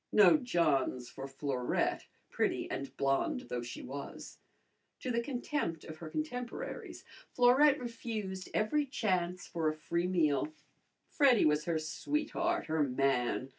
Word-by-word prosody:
No 210 - +7
Johns 155 - +1
for 135 0 -7
Florette, 135 -2 -1 0.2
pretty - - 0
and 140 - -5
blonde 140 - +1
though 120 - -2
she 120 0 -7
was. 140 +2 -8 0.6
To 255 - -2
the 235 0 +1
contempt 245 - -2
of 160 -1 -9
her 160 -1 -8
contemporaries 250 - -5 0.3
Florette 265 +4 +6
refused 220 -6 -5
every 285 +8 +1
chance 185 -8 -1
for 165 -2 -2
a 155 - -3
free 170 +3 -1
meal. 160 - +2 0.6
Freddy 270 -6 +5
was 150 0 +2
her 170 -2 +1
sweetheart, 300 - -1
her 160 -1 0
man. 130 -2 +1
175 Hz, 135 wpm, -33 LUFS, -, 0.6 s, No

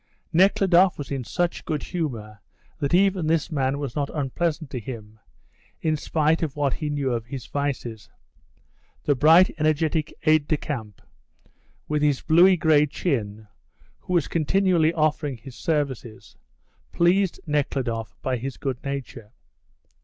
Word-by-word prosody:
Nekhludoff 185 0 +4
was 145 - -7
in 135 -2 -2
such 175 +7 -2
good 150 -2 -3
humour 115 - -4 0.4
that 140 -3 -1
even 190 -3 +2
this 165 +1 +1
man 135 -2 0
was 140 -4 -5
not 140 -1 -1
unpleasant 155 +1 -2
to 125 - -3
him, 110 -2 -9 0.6
in 155 -1 0
spite 155 +1 +1
of 155 -4 -2
what 145 -2 0
he 155 -3 -3
knew 140 -3 -1
of 115 -1 -4
his 130 -1 -7
vices. 125 -7 -4 0.9
The 145 - +3
bright, 160 +7 +5
energetic 155 0 +1
aide 155 -2 +3
de 155 - +1
camp, 110 - -6 0.8
with 150 -1 0
his 145 -3 +2
bluey 180 +3 +6
grey 155 -2 +4
chin, 110 - -3 0.5
who 180 - -5
was 170 -4 +2
continually 170 0 +2
offering 155 -4 0
his 125 +2 -12
services, 135 -8 -3 0.6
pleased 180 +2 +2
Nekhludoff 130 - -2
by 130 -1 0
his 130 +2 -5
good 130 -2 -4
nature. 135 -5 -6
145 Hz, 140 wpm, -24 LUFS, 130-160 Hz, 0.9 s, bluey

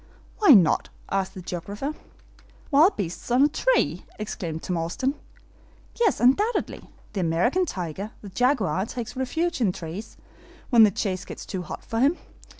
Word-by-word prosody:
"Why 360 - +8
not?" 180 -6 +3 0.2
asked 190 -1 -1
the 185 - -8
geographer. 200 - -4 0.8
"Wild 315 +8 +5
beasts 180 +1 -4
on 250 +3 +4
a - - +6
tree!" - - +1
exclaimed 170 -6 -5
Tom 180 - -2
Austin. 175 +12 -1 0.9
"Yes, 450 -4 +3
undoubtedly. 400 - +1 0.2
The 200 - -2
American 185 - +1
tiger, 185 - -4
the 200 - -8
jaguar, 220 -3 +1
takes 240 -1 -6
refuge 320 +5 -1
in 225 - +4
the 180 - 0
trees, 175 +7 -7 0.5
when 235 -2 +7
the 215 - +8
chase 185 -1 -2
gets - - -9
too 190 -2 -4
hot - - -8
for 225 -2 -2
him. 290 +8 +3
220 Hz, 155 wpm, -25 LUFS, 185-280 Hz, 0.9 s, Why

